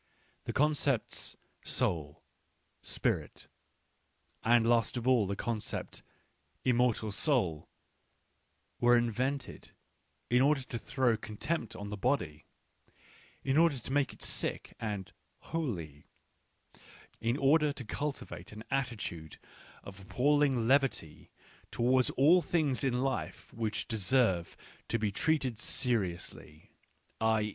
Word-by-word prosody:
The - - -2
concepts 145 -4 0
" - - -42 0.2
soul," 75 -4 -1 0.3
" - - -44
spirit," - - -2 1.0
and 115 0 +4
last 120 0 +2
of 120 +1 -3
all 120 -6 +4
the 100 - -2
concept 110 0 -3 0.3
" - - -42
immortal 120 -3 +1
soul," 100 - +1 1.1
were 120 0 +5
invented 125 +3 -2 0.5
in 125 +1 +3
order 140 0 +3
to 120 -2 -6
throw 125 -3 +1
contempt 110 +3 -3
on 100 0 -6
the 105 - -4
body, 95 - -1 1.0
in 135 +3 +2
order 165 -4 +4
to 125 - -7
make 145 -1 +2
it - - -8
sick - - -3
and 105 -4 -4
" - - -43
holy," 90 - -4 1.1
in 115 +3 0
order 150 +2 +4
to 135 -3 -8
cultivate 145 +5 -5
an 110 +1 -9
attitude 105 - -3 0.5
of 100 -1 -10
appalling 130 +3 +2
levity 135 - +1 0.4
towards 125 +1 +3
all 165 +7 +6
things 155 -7 0
in 125 -1 +1
life 135 -1 -3
which 110 -1 -2
deserve 105 -5 +1 0.3
to 115 - +1
be 105 -2 -1
treated 130 0 0
seriously, 95 - -2 0.5
i. 110 -1 +3
120 Hz, 120 wpm, -32 LUFS, 105-135 Hz, 1.1 s, all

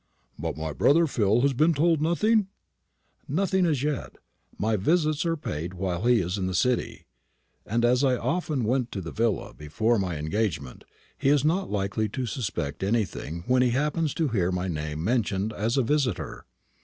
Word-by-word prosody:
"But - - -3
my 80 -1 -4
brother 165 - +4
Phil 115 -5 +2
has 140 +1 +3
been 155 +6 +3
told 160 +1 +2
nothing?" 205 +6 +2 0.8
"As 175 -3 +1
yet 150 0 +2
nothing. - - -8 0.5
My 110 +1 +1
visits 155 - +1
are 165 0 0
paid 85 - -5
while 90 +2 -2
he 120 -3 +5
is 90 +3 -2
in 95 - -1
the 95 - -2
City; 125 +5 0 0.6
and 115 +2 +1
as 125 +3 +3
I 130 -2 +3
often 155 -3 -1
went 125 +2 0
to 95 - -3
the 85 - -6
villa 115 -1 -1
before 105 +10 0
my 90 -4 -2
engagement, 80 - -3 0.3
he 135 - +2
is 145 -1 +3
not 185 +5 +1
likely 105 +2 -1
to 130 +5 -3
suspect 100 - -3
anything 95 -5 -2
when 125 0 +3
he 125 - +3
happens 150 +1 0
to 160 -3 0
hear 95 -6 +1
my 90 0 -2
name 75 -2 -4
mentioned 105 -1 0
as 110 +5 -1
a 135 - +3
visitor." 130 -5 -1
115 Hz, 180 wpm, -26 LUFS, 95-145 Hz, 0.8 s, he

